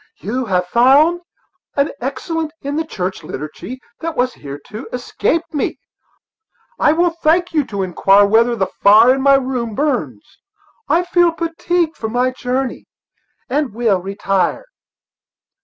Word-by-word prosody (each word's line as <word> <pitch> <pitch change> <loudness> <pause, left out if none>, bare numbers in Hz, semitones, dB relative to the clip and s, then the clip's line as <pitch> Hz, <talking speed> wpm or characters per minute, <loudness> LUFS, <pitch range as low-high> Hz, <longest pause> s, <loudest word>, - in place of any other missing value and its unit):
"You 245 +7 -3
have 180 -4 0
found 280 - +4 0.5
an 280 0 +1
excellence 310 +5 -3
in 280 +1 -3
the 320 - 0
church 190 - -4
liturgy 155 - -7 0.2
that 330 -1 -4
has 250 +1 +1
hitherto 145 - -9
escaped 320 +6 -2
me. 290 - -2 1.0
I 300 - +4
will 340 +2 +2
thank 335 +2 +1
you 305 -2 +2
to 200 -4 -3
inquire 195 +2 +4
whether 230 +3 +3
the 195 -4 0 0.2
fire 220 +5 +7
in 265 - -2
my 275 0 +5
room 255 -4 -2
burns; 220 - -3 0.5
I 330 +4 +3
feel 350 -1 +3
fatigued 335 0 -1
with 220 -1 -3
my 250 +2 +1
journey, 255 0 -3 0.6
and 275 -4 -1
will 220 -6 +1
retire." 195 - -1
255 Hz, 140 wpm, -18 LUFS, 210-315 Hz, 1.0 s, fire